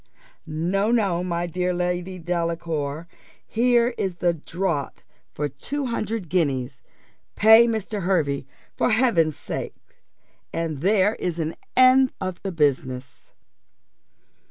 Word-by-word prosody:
No, 175 +7 0
no, 200 -7 +1
my 175 -1 -1
dear 180 +1 -1
Lady 180 +1 -2
Delacour; 165 -3 -3 0.4
here 240 +1 +3
is 190 -3 -1
the 175 0 +1
draught 165 -2 -3 0.3
for 150 - -2
two 275 - -4
hundred 225 -5 -3
guineas: 140 -6 -1 0.5
pay 220 +2 +7
Mr. 220 -2 -2
Hervey, 155 -7 0 0.3
for - - +1
Heaven's 215 - +2
sake, - - -5 0.8
and 165 -4 -3
there 200 +2 +3
is 175 -2 -3
an 160 -1 -2 0.2
end 255 0 +6
of 185 -2 -4
the 195 - -3
business." 130 -5 -1
175 Hz, 115 wpm, -24 LUFS, 160-210 Hz, 0.8 s, pay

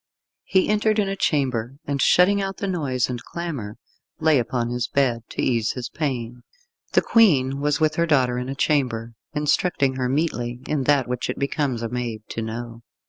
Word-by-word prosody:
He 190 -1 +2
entered 215 +1 +2
in 205 -2 +2
a 195 - -2
chamber, 130 -8 0
and 140 -1 -1
shutting 200 +7 +5
out 195 0 -3
the - - -3
noise 145 -10 0
and 125 -2 -5
clamour, 145 -12 -5 0.4
lay 155 -3 +4
upon 120 0 -1
his 125 -1 -1
bed, 130 -4 +1
to - - -3
ease 115 -3 +1
his 125 -1 -5
pain. 125 -5 -3 0.5
The - - +4
Queen 140 - +4
was 145 0 +1
with 155 -1 +1
her 170 0 +2
daughter 130 -5 +2
in 125 +1 -4
a 135 - -3
chamber, 125 -6 0 0.2
instructing 150 -2 +1
her 125 -1 0
meetly 125 -5 -1
in 145 -4 -1
that 140 -2 +3
which 125 -1 -3
it - - -2
becomes 140 -4 -1
a 115 - -2
maid 120 -3 -4
to 115 - -4
know. 115 +1 -6
130 Hz, 190 wpm, -23 LUFS, 120-155 Hz, 0.5 s, shutting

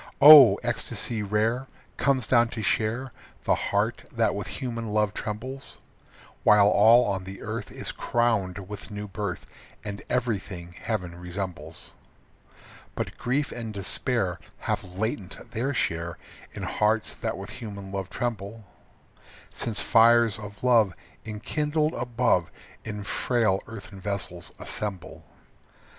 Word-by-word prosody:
Oh! 145 -4 +11
ecstasy 115 -2 -2
rare 110 +5 0 0.3
Comes 135 -3 +2
down 120 -1 +4
to 110 - -2
share 115 +5 0 0.3
The - - +3
heart - - 0
that - - +1
with - - -4
human 115 -3 -4
love 105 -1 +1
trembles; 130 +7 -6 0.7
While 105 -1 +6
all 115 +4 +6
on 95 -2 -1
the 95 +1 -9
earth - - -5
Is - - -6
crowned 100 -6 0
with 105 +1 -8
new 105 0 -6
birth 100 -2 -4 0.4
And 100 -1 -5
everything 100 -8 -2
heaven 90 -3 -3
resembles. 90 0 -6 1.0
But - - -4
grief 140 +4 0
and 115 -2 -5
despair 100 -2 0 0.2
Have - - -1
latent 110 +1 -4
their 120 +4 -1
share 85 -9 -1 0.4
In - - -6
hearts 110 +1 +1
that - - -3
with - - -8
human 100 -3 -7
love 95 -1 -4
tremble, 110 -2 -4 0.9
Since 115 -3 -1
fires 115 -1 +5
of 105 +1 -10
love 115 -7 +4 0.3
Enkindled 150 +8 -1
above 120 -8 +1 0.3
In 105 -1 -5
frail 110 -3 +1
earthen 100 -3 -9
vessels 95 -3 -4
assemble. 100 -4 -4
105 Hz, 125 wpm, -26 LUFS, 100-120 Hz, 1.0 s, Oh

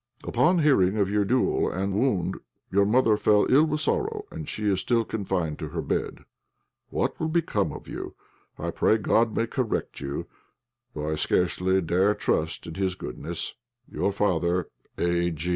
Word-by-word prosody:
"Upon 130 +10 +2
hearing 105 -9 +4
of 100 -2 +1
your 105 0 +2
duel 125 +5 +2
and 95 +2 -2
wound 100 -5 0 0.3
your 100 +1 +4
mother 110 0 +3
fell 105 0 +4
ill 150 +4 +6
with 150 -1 -1
sorrow, 420 - -1
and 155 - -6
she 105 - -4
is 95 -2 +2
still 115 +2 +1
confined 95 -8 -2
to - - -4
her - - -3
bed. - - -3 0.6
"What - - -1
will 160 - 0
become 165 0 0
of - - -9
you? - - -6 0.4
I - - -3
pray 110 - +3
God 110 +1 +2
may 115 - +1
correct 120 -1 -2
you, 70 0 -4 0.7
though 75 +1 -2
I - - 0
scarcely 95 +4 +1
dare 95 +5 +2
trust 80 +1 -1
in 80 - -7
His 95 +1 -1
goodness. 60 - -4 0.4
"Your 100 - 0
father, 90 -3 0 0.3
"A. 85 -1 +1
100 Hz, 165 wpm, -26 LUFS, 90-120 Hz, 0.7 s, ill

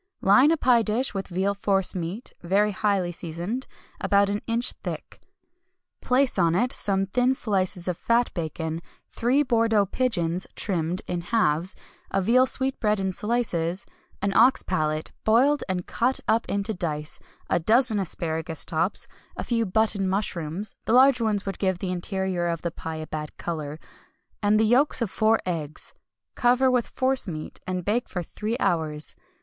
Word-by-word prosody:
Line 250 +9 +6
a 330 - +3
pie 245 -5 +4
dish 225 +4 0
with 195 -1 -4
veal 190 +3 0
force 195 -1 +1
meat, 185 +7 -5
very 200 +4 +2
highly 195 -3 0
seasoned, 175 +9 -4 0.3
about 200 0 +3
an 205 +1 -1
inch 235 +2 +2
thick. - - -8 0.8
Place 255 -4 +2
on 170 -1 +3
it 245 +7 +2
some 195 -1 +1
thin 250 +6 +1
slices 190 -6 -1
of 180 -2 -2
fat 235 +1 +1
bacon, 160 -1 -4 0.3
three 255 +5 +2
Bordeaux 225 -5 +3
pigeons 185 -6 -1
(trimmed) 175 -2 -1
in 175 -1 -2
halves, 180 -3 +1 0.3
a 195 - 0
veal 245 +7 +4
sweetbread 260 -6 +1
in 190 0 -1
slices, 190 -5 -1 0.4
an 200 0 +1
ox 250 +4 +5
palate, 155 -4 -1
boiled 265 +7 +3
and 180 -1 -2
cut 250 +3 0
up 225 +1 +2
into 200 +2 -1
dice, 155 -5 -3 0.3
a - - +1
dozen 220 +4 +3
asparagus 160 -3 -1
tops, 170 +4 0 0.3
a - - -3
few 230 -3 0
button 200 -1 +1
mushrooms 190 -1 -3
(the 220 - +1
large 260 0 +6
ones 210 -3 0
would 195 - -4
give 190 -2 +1
the 180 0 -3
interior 185 -1 -2
of 170 -1 -3
the 170 - -1
pie 160 0 -6
a 155 0 -5
bad 150 -1 -6
colour) 155 -3 -5 0.6
and 210 0 +3
the 220 - +4
yolks 255 +7 +3
of 230 -6 -1
four 220 +1 +3
eggs. 155 -4 -2 0.4
Cover 250 +2 +3
with 245 -2 +1
force 260 -2 0
meat, 155 -3 -6
and 185 -2 -3
bake 235 +4 0
for 180 -3 -3
three 215 +7 -4
hours. 155 -3 0
195 Hz, 165 wpm, -25 LUFS, 175-230 Hz, 0.8 s, Line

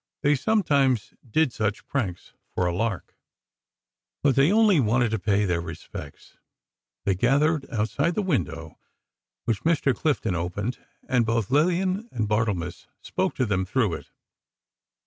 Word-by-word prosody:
They 145 - +4
sometimes 140 - +2 0.2
did 150 +2 +2
such 110 -1 -1
things, 100 -11 -3 0.2
for 90 - +1
a 85 - 0
lark. 105 0 -2 1.1
But 140 -3 +4
they 140 +6 +4
only 210 -5 +5
wanted 120 -1 +2
to 110 - 0
pay 100 +2 +2
their 85 -3 0
respects. 80 -1 -9 0.7
They 100 - +3
gathered 140 - +2
outside 140 +8 0
the 210 - 0
window, 80 - -2 0.7
which 110 -4 0
Mr. 160 -4 +2
Clifton 140 - 0
opened, 90 +7 -3 0.3
and 125 -2 +3
both 115 -1 -1
Lillian 185 - +1
and 110 -3 -1
Barthelmess 105 -5 -1 0.2
spoke - - -1
to 130 - +1
them 95 -4 0
through 100 0 0
it. - - -7
115 Hz, 140 wpm, -25 LUFS, 100-145 Hz, 1.1 s, only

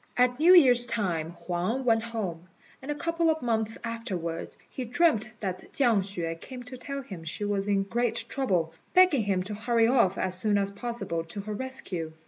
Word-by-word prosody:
At 250 +1 +3
New 350 +4 +8
Year's 250 -7 +6
time 175 -8 -1
Huang 185 +10 -2
went 225 -2 +4
home, 195 -7 -5 0.3
and 265 - -9
a 295 - 0
couple 335 +1 0
of 315 -3 0
months 225 -2 0
afterwards 185 -8 -4
he 260 - -5
dreamt 240 -4 +2
that 185 -3 -5
Chiang 235 -7 +3
hsüeh 170 -4 -4
came 255 -2 -8
to 250 +1 -9
tell 275 +1 -5
him 190 -10 -9
she 165 +6 -4
was 200 -1 -1
in 200 -1 +2
great 230 +3 -1
trouble, 180 -12 0 0.2
begging 360 - +5
him 190 -2 +1
to 205 +3 -6
hurry 230 +2 +2
off 230 -6 +3
as 185 -1 -1
soon 210 0 +2
as 200 0 0
possible 200 -6 -3
to 175 +5 -5
her 210 +1 -5
rescue. 200 -9 -5
220 Hz, 190 wpm, -28 LUFS, 185-250 Hz, 0.3 s, New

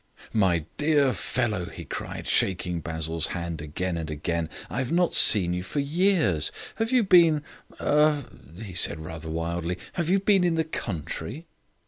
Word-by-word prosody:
"My 90 -7 +2
dear 145 -3 +3
fellow," 110 -3 -2
he - - -9
cried, - - -6
shaking 90 -2 +1
Basil's 80 0 -1
hand 85 -2 -5
again 85 +4 -3
and 80 -1 -5
again, 80 +2 -2 0.2
"I 120 - -4
have 130 -2 -2
not 175 +1 +2
seen 90 -5 +6
you 90 - -2
for 95 - -7
years. 145 - +1 0.3
Have 225 +2 -1
you 250 -3 +4
been 170 -6 +5 0.4
er 150 -2 +2 0.2
" 85 +10 -12
he 95 - -9
said, 85 -1 +1
rather 80 0 -7
wildly, 85 +2 -3 0.2
"have 170 -2 -2
you 195 +2 +4
been 195 -1 +3
in 175 -2 +2
the 160 - +1
country?" 110 - -5
95 Hz, 165 wpm, -26 LUFS, -, 0.4 s, seen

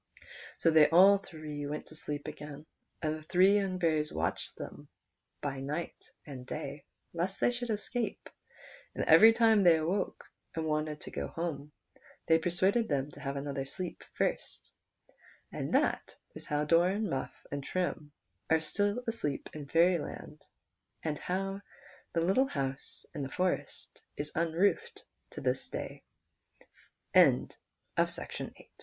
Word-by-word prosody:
' - - -14
So 165 - +5
they 155 -2 +7
all 195 +4 +7
three 155 -6 -7
went 150 +1 -4
to 155 - -11
sleep 145 -1 -4
again, 150 -1 -8 0.4
and 155 0 +1
the 155 - -8
three 185 +5 +5
young 190 -2 -1
fairies 155 -3 +1
watched 80 +1 -2
by - - -4 0.9
them 135 0 -6
night 155 +4 -5 0.2
and 135 -4 -8
day 145 +2 -6 0.3
lest 180 +3 -2
they - - +3
should 245 0 -4
escape, 220 +2 -2 0.7
and - - -1
every 225 +1 +9
time 225 -2 +5
they 170 -4 +6
woke 180 +6 -1 0.3
and 160 -1 -1
wanted 155 -1 -1
to - - -8
go - - -3
home, 150 -4 -4 0.5
they 160 0 +5
persuaded 190 +7 +2
them 140 0 -1
to 145 - -13
have 140 -1 -3
another 140 -1 -3
sleep 180 +6 -5
first, - - -2 0.8
and - - -4
that - - +1 0.2
is - - -9
how 150 0 +1
Doran, 175 +7 +3
]\Iuff, 135 -9 -2 0.2
and 145 -1 -3
Trim 165 -3 -2 0.4
are 160 - +5
still 205 +9 -1
asleep 225 -12 -2
in 150 -2 -7
Fairyland, 170 +2 +1 0.6
and 150 -2 -2
how 195 +2 -2 0.5
the 165 - +1
little 195 +11 +3
hou 135 - -1
160 Hz, 125 wpm, -31 LUFS, 150-190 Hz, 0.9 s, every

